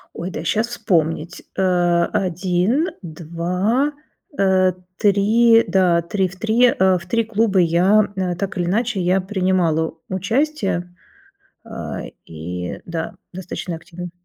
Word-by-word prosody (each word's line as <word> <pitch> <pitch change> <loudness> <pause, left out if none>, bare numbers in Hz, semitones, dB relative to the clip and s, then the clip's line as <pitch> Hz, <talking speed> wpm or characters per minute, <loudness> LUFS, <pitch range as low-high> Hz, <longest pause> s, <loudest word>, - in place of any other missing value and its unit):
Ой, 175 +3 -4
дай - - -6
сейчас 220 +2 +1
вспомнить, 170 -7 -1 0.2
э, - - +1 0.5
1, 190 - 0
2, 180 - -1 0.4
э, 185 -2 +3 0.2
3, 225 +3 +4
да, 175 -2 +3
3 190 +2 -1
в 180 - -12
3 225 +3 +3
э, 190 0 +4
в 170 - -10
3 230 +5 +1
клуба 215 -3 +1
я, 185 +5 +4
м, 180 -2 -1
так 200 0 -4
или 175 - 0
иначе 220 +2 0
я 180 +2 +2
принимала 185 -5 0 0.2
участие, 195 - -1 0.7
э, - - -6 0.2
и, 90 +3 -6
да, 165 -1 -4 0.2
достаточно 180 -1 -5
активно. 175 +1 -9
185 Hz, 125 wpm, -20 LUFS, 175-210 Hz, 0.7 s, 3